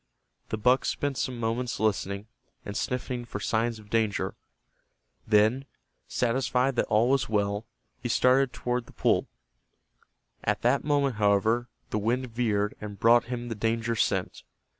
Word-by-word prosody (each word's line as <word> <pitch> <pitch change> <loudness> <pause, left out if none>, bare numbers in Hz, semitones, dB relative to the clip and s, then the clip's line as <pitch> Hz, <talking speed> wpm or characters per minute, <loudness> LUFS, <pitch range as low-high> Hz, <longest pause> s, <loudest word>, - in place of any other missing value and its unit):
The 110 - -2
buck 125 +4 +3
spent 145 -1 -1
some 125 -2 -2
moments 120 +2 -2
listening, 100 -1 -1 0.4
and 100 - -6
sniffing 125 0 -2
for 115 -3 -6
signs 115 +2 0
of 105 -1 -16
danger. 110 -3 0 0.9
Then, 110 +5 +3 0.4
satisfied 125 +1 +1
that - - +2
all 110 +2 +3
was 135 -4 +1
well, 105 0 0 0.3
he 120 - -3
started 125 +2 +4
toward 125 -1 -2
the - - -15
pool. - - +1 1.2
At - - 0
that 125 +4 +3
moment, 140 -5 +1
however, 110 +4 +2 0.2
the 105 - 0
wind 120 +4 -1
veered 105 -3 0
and 105 -2 -7
brought 120 +1 +5
him 120 0 -4
the - - -2
danger 115 +2 -1
scent. - - 0
115 Hz, 145 wpm, -28 LUFS, 105-125 Hz, 1.2 s, brought